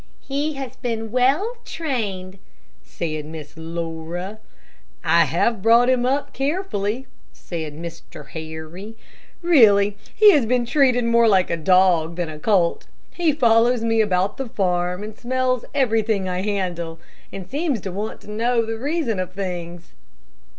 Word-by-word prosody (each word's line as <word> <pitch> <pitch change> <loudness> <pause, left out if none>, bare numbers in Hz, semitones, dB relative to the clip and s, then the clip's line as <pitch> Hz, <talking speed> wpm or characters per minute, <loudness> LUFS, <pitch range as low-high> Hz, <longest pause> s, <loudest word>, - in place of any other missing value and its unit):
"He 285 +3 -2
has 270 -4 -7
been 225 -3 -3
well 285 - +2
trained," 200 - -4 0.4
said 155 -2 -4
Miss 155 -1 -9
Laura. 165 +4 -5 0.6
"I - - +4
have 230 -4 0
brought 235 +4 +5
him 250 -1 +2
up 280 +2 -1
carefully," 270 - -2 0.3
said 160 -4 -6
Mr. 165 -3 -9
Harry. 160 +6 -8 0.5
"Really, 210 -11 +5 0.2
he 425 -1 +8
has 280 - +3
been 245 0 +1
treated 250 -1 +3
more 235 0 +4
like 190 -4 +3
a - - +2
dog 170 -1 +3
than 175 -2 -3
a 155 -1 -8
colt. 180 -2 +1 0.3
He 340 -3 +2
follows 235 -3 +3
me 225 -1 +2
about 190 -2 0
the 270 -3 -4
farm 180 -1 -1
and 215 0 -7
smells 255 0 -1
everything 220 -7 +1
I 180 0 -2
handle, 180 -5 -3 0.3
and 190 -2 -7
seems 285 - -1
to 190 - -5
want 205 +4 -5
to 210 - -10
know 230 +2 +1
the 225 0 -4
reason 285 - -1
of 185 0 -4
things. 175 -3 -6
215 Hz, 145 wpm, -22 LUFS, 180-250 Hz, 0.6 s, he